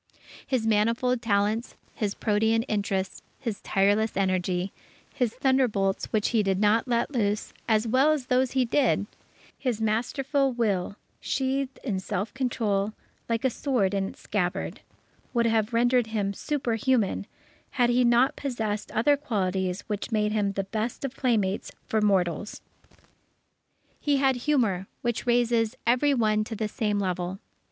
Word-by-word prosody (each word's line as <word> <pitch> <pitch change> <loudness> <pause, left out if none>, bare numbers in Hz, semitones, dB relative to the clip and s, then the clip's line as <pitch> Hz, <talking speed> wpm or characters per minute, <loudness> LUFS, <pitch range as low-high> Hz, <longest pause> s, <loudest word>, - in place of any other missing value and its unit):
His 255 -4 0
manifold 230 +3 +2
talents, 215 +1 0 0.2
his 205 -3 -2
protean 220 +1 +2
interests, 200 -5 -2 0.2
his 220 -4 -4
tireless 205 +3 +2
energy, 185 -1 0 0.4
his 245 -4 0
thunderbolts 245 -7 +1
which 215 -1 0
he 225 -3 +2
did 195 -2 0
not 215 +4 +3
let 240 +2 0
loose, 210 -5 -1
as 220 0 +2
well 265 +6 +4
as 295 -5 -1
those 255 0 +1
he 260 -2 +2
did, 240 -4 +2 0.5
his 245 -5 -1
masterful 265 +5 0
will 200 -5 0 0.2
sheathed 265 0 -2
in 205 -8 -1
self 200 +2 -3
control 220 -6 0 0.4
like 230 +2 0
a 260 - +3
sword 235 -8 0
in 195 -1 0
its - - -11
scabbard, 180 -4 -2 0.5
would 235 0 +3
have 225 -1 +2
rendered 240 0 +3
him 205 -3 -1
superhuman, 235 -5 0 0.4
had 245 -2 +2
he 250 +1 +3
not 240 +2 +4
possessed 220 -6 -3
other 265 +7 +4
qualities 190 -9 -1
which 210 +1 -4
made 210 -1 +1
him 205 -2 0
the 195 - -1
best 220 +6 -3
of 270 -1 -5
playmates 215 -7 0
for 220 - 0
mortals. 195 -1 +1 1.4
He 290 -1 +2
had 270 -2 +2
humour, 235 -9 +1 0.2
which 240 0 -2
raises 240 -1 +2
every 255 +5 +3
one 215 -3 +2
to 225 - -5
the 215 0 -1
same 210 -1 -1
level. 185 -1 -2
225 Hz, 145 wpm, -27 LUFS, 205-250 Hz, 1.4 s, well